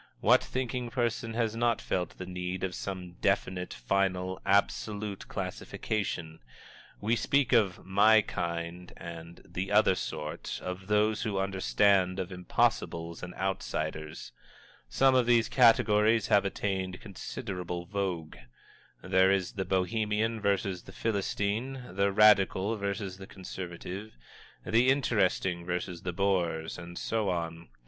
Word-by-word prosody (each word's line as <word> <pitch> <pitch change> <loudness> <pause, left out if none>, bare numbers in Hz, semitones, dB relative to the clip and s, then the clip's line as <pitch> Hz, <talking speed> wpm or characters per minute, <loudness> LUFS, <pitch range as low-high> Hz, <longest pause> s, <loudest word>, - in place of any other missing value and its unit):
What - - +5
thinking 125 -1 -3
person 115 -2 -1
has 115 -2 0
not 120 0 +2
felt 90 -2 -2
the 95 - -6
need 90 0 -4
of 95 -1 -1
some 90 -2 -6
definite, 95 -2 0
final, 95 +8 -1
absolute 100 0 0
classification? 85 -7 -4 0.6
We 110 +3 +1
speak 135 +4 +2
of 105 -7 +2
"my 105 +3 +5
kind" 85 0 -4
and 85 0 -9
"the 95 +2 -4
other 105 -2 +5
sort," 75 -4 -5
of 90 +1 -5
Those 105 +1 +2
who 105 -3 -1
Understand, 95 -1 +2
of 95 -1 -3
Impossibles, 85 -2 -1
and 90 0 -7
Outsiders. 80 -4 -3 0.6
Some 135 - +4
of 125 -2 +3
these 120 -2 +4
categories 115 -3 +4
have 100 -1 +4
attained 95 -2 -2
considerable 90 -3 -5
vogue. 90 - -3 0.7
There 95 0 +4
is 95 -2 +1
the 95 -2 -3
Bohemian 105 +4 0
versus 100 -2 0
the 95 - -13
Philistine, 110 +5 -2
the 100 0 +2
Radical 105 0 +5
versus 100 -2 -4
the 95 - -9
Conservative, 95 - -7 0.5
the 120 +3 +4
Interesting 95 -9 +1
versus 90 0 -3
the 90 - -3
Bores, 85 -4 0
and 85 0 -9
so 110 -3 -1
on. 85 -3 -3
95 Hz, 125 wpm, -30 LUFS, 90-105 Hz, 0.7 s, What